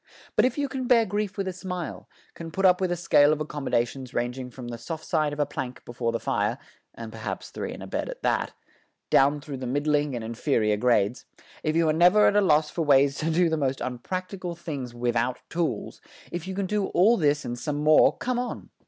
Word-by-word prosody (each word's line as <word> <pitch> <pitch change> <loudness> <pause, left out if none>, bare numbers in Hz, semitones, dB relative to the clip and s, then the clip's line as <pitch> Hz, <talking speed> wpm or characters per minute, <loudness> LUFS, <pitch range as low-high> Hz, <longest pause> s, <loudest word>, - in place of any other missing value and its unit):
But - - +5
if 255 +1 0
you 285 -1 0
can 260 -2 -4
bear 235 -2 +5
grief 205 0 -3
with 195 -1 -2
a 185 - -2
smile, 180 -2 -6 0.2
can 165 -1 -8
put 195 +4 -1
up 180 0 +5
with 185 -1 +1
a - - +1
scale 150 -4 +4
of 155 - 0
accommodations 135 -4 -2
ranging 125 +1 -2
from 125 -1 -9
the 120 -1 -6
soft 160 +5 -6
side 155 -3 +1
of 145 - -6
a 145 - +3
plank 130 -3 -6
before 120 -1 -2
the 115 - -2
fire 105 +4 0 0.4
(and 115 -1 -8
perhaps 110 0 -6
three - - -5
in - - -8
a - - -6
bed - - -3
at - - -8
that) - - 0 0.6
down 140 +2 +4
through 145 -2 -6
the 130 -1 -5
middling 145 +1 +1
and 120 - -4
inferior 115 -2 0
grades; 115 0 +1 0.4
if 155 0 -1
you 165 -1 +3
are 155 - +3
never 180 +6 +5
at - - +4
a 205 - +5
loss 155 -5 +3
for 170 - -3
ways 140 -1 +4
to 160 - -1
do 170 +2 +3
the 160 -1 0
most 135 -2 0
unpracticable 180 +8 -4
things 140 -8 -5
without 120 +1 0
tools; 165 -10 -2 0.3
if 175 +1 -5
you 190 - -4
can 200 0 -1
do 205 +1 0
all 205 +7 +4
this 150 -5 +1
and 120 0 -4
some 145 +3 -3
more 155 0 +5
come 250 -1 -1
on. 250 - -5
150 Hz, 225 wpm, -26 LUFS, 125-180 Hz, 0.6 s, But